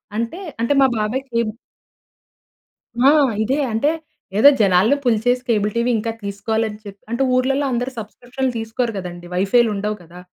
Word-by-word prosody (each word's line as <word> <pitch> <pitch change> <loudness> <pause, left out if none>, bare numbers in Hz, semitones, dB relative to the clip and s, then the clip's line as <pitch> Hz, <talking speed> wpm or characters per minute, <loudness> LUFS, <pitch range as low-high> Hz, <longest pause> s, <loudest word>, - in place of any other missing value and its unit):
అంటే 230 - -3 0.2
అంటే 235 +5 +2
మా 265 - +6
బాబాయి 215 +5 -1
కేబు 230 -2 -1 1.6
ఆ! - - +7 0.3
ఇదే 265 +6 0 0.2
అంటే 285 +7 +2 0.5
ఏదో 280 +6 +8
జనాల్ని 195 +7 +4
పుల్ 240 -4 +3
చేసి 250 0 +2
కేబుల్ 210 -2 +1
టీవీ 235 +1 +1
ఇంకా 225 +1 -2
తీసుకోవాలి 220 +3 -1
అని 210 - -9
చె 205 - -8 0.2
అంటే 235 +3 0
ఊర్లల్లో 270 +3 +1
అందరూ 245 +2 -1
సబ్స్క్రిప్షన్‌లు 245 +4 -4
తీసుకోరు 225 +2 -2
కదండీ 175 -1 -7
వైఫైలు 220 +5 +3
ఉండవు 210 +2 -2
గదా! 175 +2 -14
230 Hz, 155 wpm, -20 LUFS, 210-250 Hz, 1.6 s, ఏదో